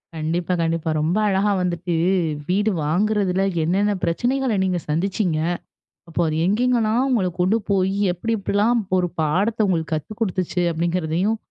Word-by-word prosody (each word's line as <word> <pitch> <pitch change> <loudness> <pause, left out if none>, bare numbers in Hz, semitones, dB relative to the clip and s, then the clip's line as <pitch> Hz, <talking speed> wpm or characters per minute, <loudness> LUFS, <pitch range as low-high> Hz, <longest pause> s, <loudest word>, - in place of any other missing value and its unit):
கண்டிப்பா. 165 +3 -1
கண்டிப்பா. 165 0 -1
ரொம்ப 165 +7 +1
அழகா 200 +1 +2
வந்துட்டு, 175 -1 -2 0.6
வீடு 205 +3 +2
வாங்குறதில, 190 +3 +1 0.2
என்னென்ன 195 +6 +1
பிரச்சனைகளை 245 +7 0
நீங்க 185 -2 0
சந்திச்சீங்க. 180 +1 0 0.7
அப்ப, 165 - -6
அது 155 0 -1
எங்கெங்கலாம் 235 +3 +2
உங்கள 205 -7 +2
கொண்டு 190 +5 +3
போய், 190 -1 +2 0.2
எப்படி 225 +6 -3
எப்படிலாம் 210 +4 +1 0.2
ஒரு 180 -1 +1
பாடத்தை 200 +9 +1
உங்களுக்கு 165 -3 -1
கத்து 155 +8 -5
குடுத்துச்சு 185 -3 -1
அப்படிங்கிறதையும், 170 +5 0
185 Hz, 130 wpm, -22 LUFS, 170-215 Hz, 0.7 s, கொண்டு